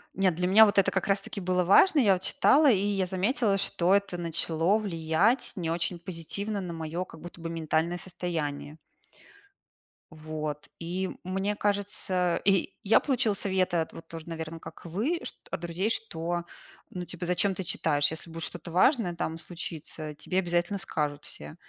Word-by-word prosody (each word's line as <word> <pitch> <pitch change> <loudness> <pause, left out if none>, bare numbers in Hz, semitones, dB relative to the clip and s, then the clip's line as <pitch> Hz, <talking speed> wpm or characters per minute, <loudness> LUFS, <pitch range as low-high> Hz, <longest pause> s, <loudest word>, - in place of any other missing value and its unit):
Нет, 185 -4 +2
для 180 +1 0
меня 220 +4 +8
вот 205 - 0
это 195 - +4
как 190 - -1
раз 195 0 +2
таки 200 - -6
было 180 0 +1
важно. 250 - +6
Я 210 -7 +5
вот 185 - -2
читала, 285 +8 +5
и 225 - +5
я 195 -2 0
заметила, 200 +2 +1
что 190 -1 +3
это 200 -3 0
начало 165 +3 +1
влиять 195 +4 +1
не 165 -4 -2
очень 175 +1 -1
позитивно 195 +4 -4
на 180 -2 -5
моё 165 +2 -3
как 165 - -13
будто 175 +1 -10
бы 165 - -4
ментальное 165 +1 0
состояние. 160 -5 -4 1.3
Вот, 155 -1 -5
и 180 +3 -2
мне 195 +3 -1
кажется, 195 -3 0
и 195 -3 +2
я 210 - +5
получила 245 -6 +1
советы 190 -3 +1
от 160 -1 -1
вот 165 0 -11
тоже, 165 0 -9
наверное, 165 0 -5
как - - -11
вы, 225 - -1
чт - - -6
от - - -3
друзей, 175 +4 -1
что, 175 -6 -2 0.5
ну, 180 - -5
типа, 175 0 -6
зачем 185 +2 +2
ты 190 - -3
читаешь, 145 -4 +1
если 160 +1 -6
будет 165 0 -6
что-то 175 -1 -6
важное 185 - +3
там 165 -1 -3
случится, 160 -2 -6
тебе 155 +5 -4
обязательно 175 +2 0
скажут 150 -5 -3
все. 75 0 -8
180 Hz, 175 wpm, -28 LUFS, 165-195 Hz, 1.3 s, меня